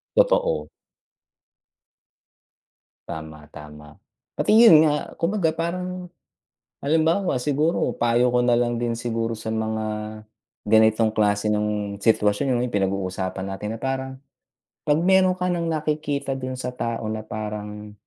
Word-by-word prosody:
Totoo. - - +2 2.4
Tama, 80 -1 -8
tama. 75 0 -12 0.4
Pati - - +1
yun 195 -10 +8
nga, 150 -1 -1
kumbaga 170 -2 0
parang 180 +2 -4 0.8
halimbawa 160 +3 +2
siguro 150 +5 0
payo 120 +1 +2
ko 125 - +3
nalang 120 0 +2
din 120 -1 0
siguro 115 -1 -2
sa 110 - -6
mga 110 0 -2 0.8
ganitong 110 +1 +4
klase 105 -1 +1
ng 105 -1 -1
situwasyon, 105 +2 +2
'no, 120 - 0
yung 125 - -3
pinag-uusapan 95 -1 -2
natin 95 +2 -5
na - - -10
parang, 135 0 -3 0.7
'pag 150 0 +3
meron 185 +1 +4
ka 180 0 -2
nang 170 -1 -1
nakikita 150 -3 -2
dun 130 0 -5
sa 125 - -3
tao 115 -2 -3
na 110 0 -4
parang, 105 -1 -6
120 Hz, 125 wpm, -23 LUFS, 105-155 Hz, 2.4 s, yun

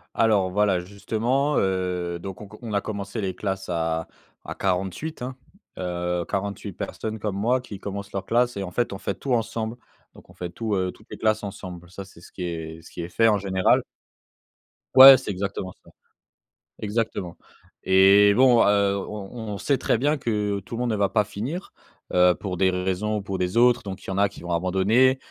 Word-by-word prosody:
Alors 105 -5 +3
voilà 100 -1 +2
justement, 115 +9 -1
heu, 90 -2 -1
donc 95 +2 -8
on 105 - -9
q 105 +2 -13
on 110 -3 -5
a 100 - +1
commencé 100 +1 -5
les 95 -2 -3
classes 95 -2 -4
à 80 -1 -1 0.4
à - - -7
48, 95 - -2
hein. 125 +1 -5 0.4
Heu, 90 -1 -2
48 100 0 -3
personnes 110 +4 -5
comme 100 -2 -3
moi 120 +5 +1
qui 105 -6 -9
commencent 100 0 -6
leur 95 -1 -4
classe 120 -1 +1
et 100 - -2
en 90 - -6
fait 120 +3 -1
on 95 - -5
fait 100 - -3
tout 135 -3 -3
ensemble, 115 0 -1 0.4
donc - - -16
on - - -17
fait 90 -1 -6
tout 110 +4 -3
heu, 95 -1 0
toutes 105 - -20
les - - -6
classes 110 -1 +1
ensemble, 90 -3 -8
ça 100 +1 -8
c'est 85 -3 -17
ce - - -15
qui 90 - -9
est 80 -1 -5
ce - - -15
qui 85 - -7
est 85 - -6
fait 115 +5 +3
en 105 -2 +4
général. 95 -1 +2 1.1
Ouais, 135 0 +12
c'est 125 - -7
exactement 95 -1 -4
ça! - - -18 0.9
Exactement! 105 -5 -2 0.5
Et 100 +2 +6
bon, 125 -2 +6
heu, 100 -1 +3
on 100 0 -6
on 110 -4 -6
on - - -4
sait 140 +4 +1
très - - +1
bien 145 +4 +1
que 105 -5 -1
tout 100 +5 -8
le - - -5
monde 125 - 0
ne - - 0
va 100 -1 +3
pas 105 0 +2
finir, 125 - -5 0.4
heu, 90 0 +5
pour 90 -3 -5
des 95 0 +3
raisons 95 +4 -1
ou 105 - -3
pour 95 -1 -4
des 90 +3 -2
autres, 120 +1 +5
donc 95 -1 -7
il - - -13
y - - -3
en 95 - -3
a 100 0 +4
qui - - -13
vont 85 0 -6
abandonner, 95 +9 +3
100 Hz, 215 wpm, -24 LUFS, 95-110 Hz, 1.1 s, Ouais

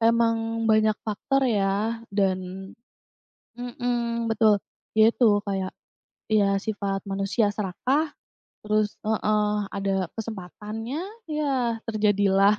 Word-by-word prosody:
emang 230 0 +2
banyak 215 -1 +4
faktor 270 +6 0
ya 215 0 +1
dan 190 -1 -1 0.8
mhm, 240 -1 -2
betul 220 -2 +4 0.4
ya 220 +1 +6
itu 235 -4 +5 0.2
kayak, 190 -1 -1 0.6
ya 200 -2 +3
sifat 200 -1 -3
manusia 195 +3 +1
serakah, 260 - 0 0.6
terus 210 0 +1
heeh, 210 -1 +2 0.2
ada 195 -3 -1
kesempatannya 220 - -5 0.3
ya 265 -6 0
terjadilah, 205 -2 +3
215 Hz, 95 wpm, -25 LUFS, 200-230 Hz, 0.8 s, ya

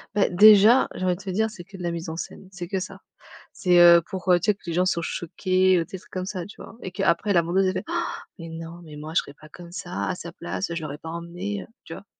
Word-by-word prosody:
Beh, 205 - +3
déjà, 215 +6 +7
j'ai 185 - -5
envie 180 -1 +2
de - - -12
te 195 - -7
dire, 220 +4 +1
c'est 185 -5 -11
que 195 - -14
de 180 - -8
la 170 - -1
mise 170 0 -5
en 160 - -4
scène, 185 +2 -7
c'est 180 -2 -8
que 190 -2 -1
ça. 190 - -7 0.5
C'est, 180 -1 +3
heu, 170 0 +8
pour, 190 +1 -6
heu, 175 -1 +5
tu - - -3
sais 210 - +5
que - - -38
les 170 - -3
gens 180 +2 +2
soient 170 -2 0
choqués, 185 +2 +1
heu, 165 - 0
des 190 - -8
trucs 180 - -20
comme 185 0 -3
ça, 185 -3 -4
tu 205 - -13
vois? - - -11
Et 185 - -5
qu'après 195 +1 +1
la 170 -3 +5
vendeuse, 185 +3 +1
elle - - +2
fait: 185 - -3
«Han! 340 0 -1 0.4
Mais 165 0 -8
non, 165 +1 -8
mais 150 -2 -11
moi 155 +2 -7
je - - +5
serais 140 - -4
pas 155 +1 -16
comme 175 +1 -12
ça 100 - -4
à - - -1
sa - - -8
place, 95 - -4
je 165 - -3
l'aurais 145 -1 -5
pas 160 +2 -9
emmené, 175 +4 -5
heu», - - -15 0.2
tu - - -11
vois? - - -8
180 Hz, 300 wpm, -24 LUFS, 170-190 Hz, 0.5 s, heu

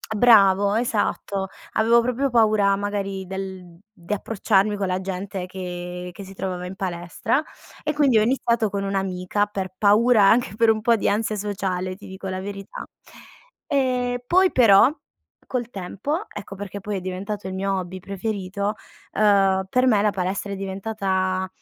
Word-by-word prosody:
Bravo, 200 -3 +5
esatto. 205 -4 -1 0.2
Avevo 230 +2 +4
proprio 250 +3 -1
paura 215 -4 +4
magari 195 -1 -3
del 190 -2 -7 0.2
di 175 -3 -11
approcciarmi 205 0 +1
con 200 -1 -2
la 185 0 -1
gente 190 0 -4
che 180 -1 -6
che 190 +3 -10
si 195 0 -11
trovava 185 -2 -4
in 180 +1 -7
palestra 180 - -2 0.4
e 300 - -1
quindi 280 -6 +3
ho 215 - +5
iniziato 235 -2 +1
con 200 0 -2
un'amica 195 0 -1
per 195 -3 -5
paura 215 +2 +5
anche 220 -2 +3
per 225 +1 +4
un 220 -1 -1
po' 230 +1 +4
di 220 - -1
ansia 215 +1 0
sociale, 190 -3 -3
ti 200 - -13
dico 190 +1 -8
la 185 0 -3
verità. 195 0 -7 0.8
E 250 -3 0
poi 370 +5 +4
però 225 -2 +6 0.6
col 240 -2 -3
tempo, 230 - -4
ecco 205 -1 -8
perché 200 0 -6
poi 205 0 -4
è - - -5
diventato 190 +2 -5
il 190 - -5
mio 195 +1 -1
hobby 185 0 -5
preferito, 200 +1 -3 0.4
uhm, 195 -2 +3
per 255 +4 +2
me 220 -6 +4
la 210 - +3
palestra 195 +1 -3
è - - -3
diventata 190 -1 -2
200 Hz, 160 wpm, -23 LUFS, 190-220 Hz, 0.8 s, però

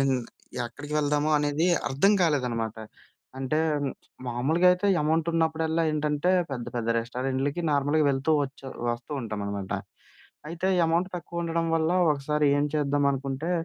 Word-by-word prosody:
ఎమ్ 135 -1 +2 0.5
ఎక్కడికి 145 +5 -8
వెళ్దాము 150 +1 +1
అనేది 145 +3 0 0.2
అర్థం 145 +11 +3
కాలేదనమాట. 125 -9 0 0.6
అంటే 135 +3 0 0.7
మామూలుగా 135 +9 +1
అయితే 180 +3 -1
అమౌంట్ 160 +2 +1
ఉన్నప్పుడల్లా 160 0 +1
ఏంటంటే 150 +2 0 0.2
పెద్ద 125 -3 -4
పెద్ద 115 -1 -2
రెస్టారెంట్లకి 130 +6 -2
నార్మల్‌గా 145 +2 +2
వెళ్తూ 135 +3 -1
వచ్చి 135 0 -7 0.3
వస్తూ 120 +5 -6
ఉంటాం 110 -3 -4
అనమాట. 100 -1 -4 0.8
అయితే 170 +3 -2 0.2
అమౌంట్ 170 +3 +1
తక్కువ 170 0 -5
ఉండడం 165 0 -1
వల్ల 160 0 +1 0.2
ఒకసారి 150 +1 0
ఏం 145 - +2
చేద్దాం 145 -1 +1
అనుకుంటే, 135 +4 -3
145 Hz, 130 wpm, -27 LUFS, 135-160 Hz, 0.8 s, అర్థం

